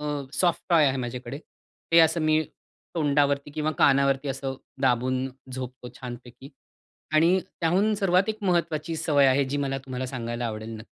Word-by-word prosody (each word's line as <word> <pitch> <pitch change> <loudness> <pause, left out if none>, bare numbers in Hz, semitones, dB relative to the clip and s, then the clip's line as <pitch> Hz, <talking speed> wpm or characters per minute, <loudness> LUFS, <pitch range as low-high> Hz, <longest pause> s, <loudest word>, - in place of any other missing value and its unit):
अ, - - -6 0.3
soft 175 0 +1
toy 165 -4 +5
आहे 135 -1 +1
माझ्याकडे. 125 +1 -5 0.5
ते 170 - +7
असं 160 +1 +3
मी 155 0 +3 0.5
तोंडावरती 145 -2 +1
किंवा 155 +1 -1
कानावरती 140 0 +3
असं 135 0 -3 0.3
दाबून 130 0 +1 0.3
झोपतो 125 -1 -7
छानपैकी 125 +1 -10 0.7
आणि 165 +4 +5 0.2
त्याहून 190 +6 +2
सर्वात 195 -1 +2
एक 215 - -2
महत्त्वाची 165 -3 0
सवय 150 -3 +3
आहे, 135 +1 +3
जी 135 +2 -3
मला 135 -1 -1
तुम्हाला 130 -1 -5
सांगायला 120 -1 -4
आवडेल 110 0 -5
नक्की. 110 - -10
140 Hz, 155 wpm, -26 LUFS, 130-160 Hz, 0.7 s, ते